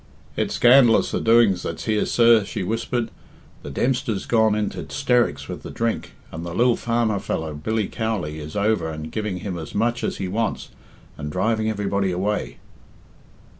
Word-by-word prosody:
"It's -, -, -1 dB
scandalous 120 Hz, -2 st, +5 dB
the -, -, -1 dB
doings 115 Hz, -5 st, +4 dB
that's 85 Hz, -, -5 dB
here, 105 Hz, -2 st, +1 dB
sir," 115 Hz, -2 st, +5 dB
she 100 Hz, -, -4 dB
whispered. 115 Hz, +3 st, -2 dB, 0.5 s
"The -, -, -8 dB
Dempster's 120 Hz, -, -1 dB
gone 110 Hz, -2 st, +3 dB
into 105 Hz, -1 st, -2 dB
'sterics 125 Hz, -4 st, +1 dB
with -, -, -6 dB
the -, -, -8 dB
drink, 115 Hz, -1 st, -2 dB, 0.2 s
and 80 Hz, +1 st, -6 dB
the 85 Hz, 0 st, -6 dB
lil 120 Hz, +2 st, +4 dB
farmer 115 Hz, -3 st, 0 dB
fellow, 80 Hz, -4 st, -3 dB
Billiam 105 Hz, +8 st, -2 dB
Cowley, 100 Hz, -10 st, -2 dB
is 75 Hz, 0 st, -8 dB
over 105 Hz, -4 st, +1 dB
and 80 Hz, 0 st, -6 dB
giving 105 Hz, -5 st, -3 dB
him 95 Hz, -4 st, -4 dB
as 80 Hz, -3 st, -8 dB
much 120 Hz, +3 st, 0 dB
as -, -, -2 dB
he 95 Hz, -, -3 dB
wants, 110 Hz, +4 st, -2 dB, 0.5 s
and 75 Hz, 0 st, -4 dB
driving 110 Hz, +4 st, 0 dB
everybody 100 Hz, -2 st, -1 dB
away." 90 Hz, -8 st, -2 dB
105 Hz, 170 wpm, -23 LUFS, 90-115 Hz, 0.5 s, scandalous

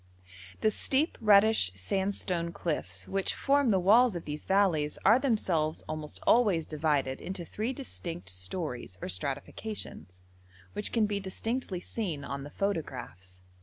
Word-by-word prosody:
The 215 Hz, -, +3 dB
steep, 275 Hz, +8 st, +3 dB
reddish 210 Hz, -, +5 dB
sandstone 180 Hz, -, -1 dB
cliffs 95 Hz, -, -3 dB
which 195 Hz, -1 st, -1 dB
form 280 Hz, -2 st, +3 dB
the 195 Hz, -3 st, +4 dB
walls 220 Hz, +4 st, +5 dB
of 170 Hz, -, -5 dB
these 150 Hz, 0 st, -5 dB
valleys 180 Hz, -7 st, +2 dB
are 220 Hz, +5 st, +7 dB
themselves 180 Hz, -, 0 dB
almost 155 Hz, -1 st, -4 dB
always 205 Hz, -9 st, +4 dB
divided 145 Hz, -4 st, 0 dB
into 185 Hz, -2 st, -5 dB
three 220 Hz, +8 st, -3 dB
distinct 90 Hz, -, -5 dB
stories 95 Hz, -, -5 dB
or -, -, -5 dB
stratifications, 115 Hz, -, -5 dB, 0.5 s
which 210 Hz, -, -3 dB
can 225 Hz, -2 st, +3 dB
be 205 Hz, -1 st, -1 dB
distinctly 195 Hz, 0 st, -3 dB
seen 175 Hz, -12 st, -3 dB
on 140 Hz, 0 st, -4 dB
the 145 Hz, -, -8 dB
photographs. 125 Hz, -, -4 dB
175 Hz, 135 wpm, -30 LUFS, 140-210 Hz, 0.5 s, are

